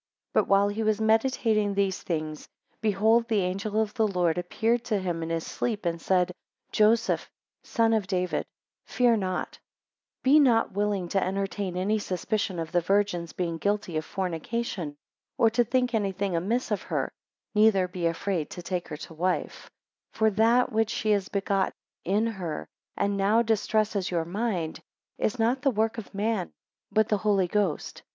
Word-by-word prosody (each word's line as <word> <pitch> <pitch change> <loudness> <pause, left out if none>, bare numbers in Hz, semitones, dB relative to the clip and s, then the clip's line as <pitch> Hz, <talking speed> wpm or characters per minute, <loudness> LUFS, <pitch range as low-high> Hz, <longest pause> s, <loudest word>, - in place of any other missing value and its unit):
8 - - -56
But - - +3
while 200 +1 +4
he 205 +2 -2
was 215 -1 +1
meditating 220 -2 +2
these 195 -2 0
things, 155 -3 -4 0.3
behold 220 +3 +3
the 220 -4 +2
angel 195 +4 -1
of 215 -1 0
the 225 -3 +2
Lord 180 -3 +1
appeared 225 +6 0
to 220 -4 +1
him 175 -3 -2
in 165 - -3
his 165 -1 -2
sleep, 215 -5 -3
and 170 -1 -1
said, 180 -1 +2 0.4
Joseph, 220 +2 +2 0.3
son 225 -1 +1
of 215 -4 +1
David, 180 -1 -1 0.4
fear 245 -2 +3
not; 185 -4 -3 0.7
9 265 - +5
Be 305 - +8
not 240 -6 +4
willing 200 -2 -1
to 195 - +1
entertain 195 -1 -2
any 205 +4 +1
suspicion 190 0 -2
of 165 -1 -4
the 175 - +2
Virgin's 180 -2 +1
being 170 -2 -3
guilty 205 -4 -1
of 155 - 0
fornication, 185 -2 -3 0.4
or 225 - +4
to 240 +2 +3
think 250 +1 0
any 205 -3 +1
thing 195 -1 -1
amiss 220 +9 -1
of 210 - 0
her, - - -2 0.4
neither 210 -4 +4
be 180 -2 -2
afraid 165 -1 -2
to 175 - -8
take 180 -1 -3
her 150 - -6
to 165 - -9
wife: 180 +3 -2 0.4
10 - - -17
For 220 0 +4
that 230 +5 +3
which 220 -1 0
is 205 -3 +2
begotten 195 -1 0 0.3
in 205 +5 +2
her 185 -9 -4 0.3
and 200 0 +1
now 210 +4 +3
distresses 215 -3 +1
your 170 -2 -1
mind, 185 -3 -2 0.4
is 215 - 0
not 235 +3 +1
the 280 - +3
work 225 0 0
of 215 - -10
man, 205 -2 -1 0.4
but 220 0 +3
the 210 - +3
Holy 200 -4 +2
Ghost. 195 -5 -1
200 Hz, 175 wpm, -27 LUFS, 180-220 Hz, 0.7 s, Be